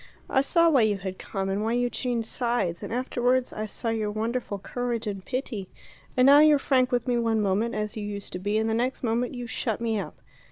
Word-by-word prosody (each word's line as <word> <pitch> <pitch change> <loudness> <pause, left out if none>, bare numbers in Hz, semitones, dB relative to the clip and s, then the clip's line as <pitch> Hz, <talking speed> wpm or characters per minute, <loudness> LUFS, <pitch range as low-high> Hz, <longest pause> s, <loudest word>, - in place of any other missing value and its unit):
I 265 - +4
saw 335 +4 +3
why 285 -6 +5
you 215 -2 +2
had 190 -1 -6
come, 195 -1 -4
and 195 +1 -1
why 225 +1 0
you 245 0 +2
changed 240 -2 -2
sides, 235 -10 0
and - - -6
afterwards 250 +1 0
I 215 0 -4
saw 230 +3 -3
your 220 -2 -1
wonderful 220 0 -2
courage 235 +3 -3
and 195 -3 -4
pity. 235 -7 -4 0.5
And 255 - +5
now 280 +2 +8
you're 305 -1 +7
frank 260 -2 +2
with 245 0 0
me 245 -1 +2
one 225 -1 +1
moment, 210 +3 0
as 210 0 -3
you 215 - -4
used 205 -1 -6
to 180 - -3
be, 205 +3 0
and 220 0 +1
the 220 - 0
next 245 +4 -1
moment 240 +2 0
you 245 -1 -5
shut 225 -1 -2
me 225 -2 0
up. - - -6
230 Hz, 235 wpm, -26 LUFS, 210-250 Hz, 0.5 s, now